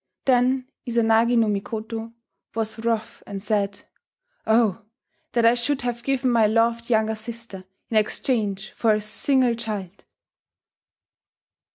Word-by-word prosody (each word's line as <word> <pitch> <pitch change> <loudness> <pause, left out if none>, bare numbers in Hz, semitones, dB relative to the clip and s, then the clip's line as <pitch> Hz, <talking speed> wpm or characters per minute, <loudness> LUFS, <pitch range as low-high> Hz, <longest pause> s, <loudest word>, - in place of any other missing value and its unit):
Then 255 0 +3 0.2
Izanagi 230 +1 +3
no 230 - +4
Mikoto, 220 +2 -4 0.4
was 220 0 -2
wroth 225 -1 -2
and 195 -1 -6
said, 205 -2 -1 0.7
"Oh! 220 -2 +3 0.5
that 235 -1 +3
I 230 - +7
should 245 +3 -1
have 240 -1 -2
given 260 0 0
my 225 -2 +4
loved 230 +2 +1
younger 220 -1 +2
sister 220 -3 -8 0.2
in 225 - 0
exchange 215 -2 -1
for 220 -2 +2
a 210 - -2
single 250 +3 +2
child!" 210 -5 -5
225 Hz, 125 wpm, -24 LUFS, 215-235 Hz, 0.7 s, I